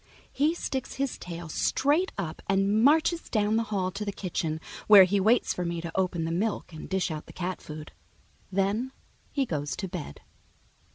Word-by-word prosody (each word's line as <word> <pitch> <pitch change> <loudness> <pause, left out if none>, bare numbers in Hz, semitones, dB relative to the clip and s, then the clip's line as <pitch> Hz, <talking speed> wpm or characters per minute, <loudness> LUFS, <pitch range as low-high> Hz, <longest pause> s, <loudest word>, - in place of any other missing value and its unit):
He 300 +5 +2
sticks 265 -6 -3
his 275 -1 -2
tail 170 -1 -7
straight 290 - +1
up 170 -5 -4
and 195 +3 +3
marches 320 +4 +3
down 215 -1 +2
the 225 - +3
hall 190 -3 0
to 195 +3 -4
the 205 - -2
kitchen, 165 -5 -3 0.3
where 205 -2 +10
he 195 +2 +2
waits 220 +5 +3
for 180 - -3
me 170 -1 -2
to 165 0 -5
open 180 -3 0
the 165 - -2
milk 195 0 -1
and 155 - -8
dish 190 -3 0
out 155 -1 -6
the - - -10
cat 180 -1 -4
food. 150 0 -8 0.6
Then 200 +7 0 0.4
he 275 -2 +1
goes 145 - -2
to 190 - -4
bed. 170 - -7
195 Hz, 185 wpm, -28 LUFS, 170-225 Hz, 0.6 s, where